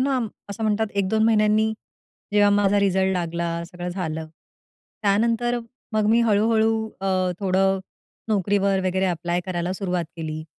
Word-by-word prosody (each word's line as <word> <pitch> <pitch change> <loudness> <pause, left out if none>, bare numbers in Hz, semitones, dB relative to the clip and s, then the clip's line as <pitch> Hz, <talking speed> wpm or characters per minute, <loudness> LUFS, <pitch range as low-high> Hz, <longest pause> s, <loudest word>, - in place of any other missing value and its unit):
ना, 270 0 +1
आम 230 -3 -1 0.2
असं 200 +2 -6
म्हणतात 215 +1 +1
1-2 200 +2 +1
महिन्यांनी 215 0 +3 0.6
जेव्हा 205 -1 +5
माझा 205 0 +3
रिझल्ट 190 -1 +2
लागला, 170 -1 -2 0.2
सगळं 175 +1 -7
झालं. 160 -3 -4 0.8
त्यानंतर 230 +4 +2 0.3
मग 215 -1 +1
मी 235 +1 +4
हळू-हळू 220 0 +3 0.3
अ, 195 - -3 0.3
थोडं 195 0 +2 0.5
नोकरीवर 200 -1 +1
वगैरे 190 +1 +1
ॲप्लाय 175 0 -1
करायला 180 -1 -2
सुरुवात 180 -2 -2
केली. 155 -1 -5
195 Hz, 135 wpm, -23 LUFS, 180-215 Hz, 0.8 s, जेव्हा